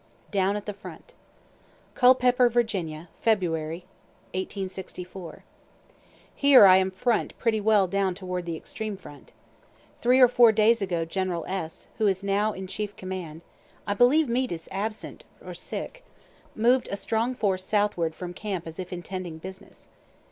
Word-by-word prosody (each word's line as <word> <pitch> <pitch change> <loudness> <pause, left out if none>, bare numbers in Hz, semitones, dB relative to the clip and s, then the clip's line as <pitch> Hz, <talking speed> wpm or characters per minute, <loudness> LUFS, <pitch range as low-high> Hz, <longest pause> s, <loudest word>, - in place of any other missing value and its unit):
DOWN 195 -1 +1
AT 210 - -5
THE 210 - -4
FRONT 200 - -12 0.8
CULPEPPER, 250 -1 +5
VA., 185 -9 -1 0.2
Feb. 185 0 -3
'64. 180 -2 -9 0.9
Here 280 -6 +7
I 185 -1 +8
am 190 0 +2
FRONT 225 +5 -1
pretty 220 -2 0
well 210 -2 +4
down 195 0 0
toward 180 -2 -5
the 165 -1 -3
extreme 215 +4 -6
front. 145 -6 -14 0.7
Three 250 +2 +4
or 250 - +9
four 240 -1 +6
days 220 +1 +3
ago 175 -4 -1
General 175 0 -2
S., 180 -4 -5
who 215 - +3
is 195 0 0
now 200 +2 +1
in 190 -1 -6
chief 205 +2 -5
command, 180 -4 -7 0.4
(I 205 - 0
believe 265 +8 +4
Meade 250 +2 0
is 165 -1 -8
absent, 215 +3 -5 0.3
sick,) - - -7 0.5
moved 240 +3 +3
a - - -1
strong 225 +5 -1
force 190 -5 0
southward 195 -6 0
from 175 -1 -6
camp 190 -3 -4
as 165 +2 -9
if 185 0 -6
intending 180 -2 -6
business. 190 +4 -12
195 Hz, 145 wpm, -26 LUFS, 180-220 Hz, 0.9 s, or